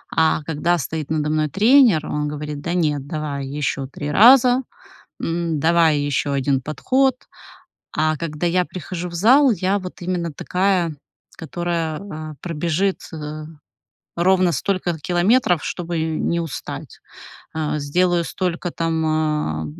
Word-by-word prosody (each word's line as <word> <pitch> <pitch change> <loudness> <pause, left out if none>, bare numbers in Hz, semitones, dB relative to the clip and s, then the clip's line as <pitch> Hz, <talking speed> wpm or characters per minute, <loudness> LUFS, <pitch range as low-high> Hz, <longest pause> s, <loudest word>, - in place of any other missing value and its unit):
а 160 -1 +2
когда 160 +3 0
стоит 155 -1 -4
надо 150 -1 0
мной 155 -1 +1
тренер, 215 - +5
он 150 0 -2
говорит: 150 0 -5
"Да 170 +3 -3
нет, 150 -5 0
давай 145 -3 -4
ещё 140 -1 -2
3 145 +2 -5
раза, 250 - +6 0.6
м, 165 -2 -1
давай 165 -1 +4
ещё 145 0 -1
один 135 -1 +1
подход". 260 - +1 0.8
А 155 0 +1
когда 155 +2 -3
я 180 +1 +2
прихожу 180 0 -6
в 170 - -10
зал, 255 - +5
я 195 0 0
вот 185 -1 -9
именно 175 -2 -2
такая, 180 +1 0 0.4
которая, 165 -1 -2
а, 155 -6 -7
пробежит, 170 +3 -1
э, 155 0 -6 0.7
ровно 180 0 +3
столько 180 +3 -1
километров, 180 - +2
чтобы 175 -1 -3
не 160 +1 -1
устать, 165 -4 -6 0.5
а. 155 -1 -1
Сделаю 175 +4 +1
столько 175 -1 -3
там, 165 -1 -1
а, 150 - 0
165 Hz, 135 wpm, -21 LUFS, 150-180 Hz, 0.8 s, раза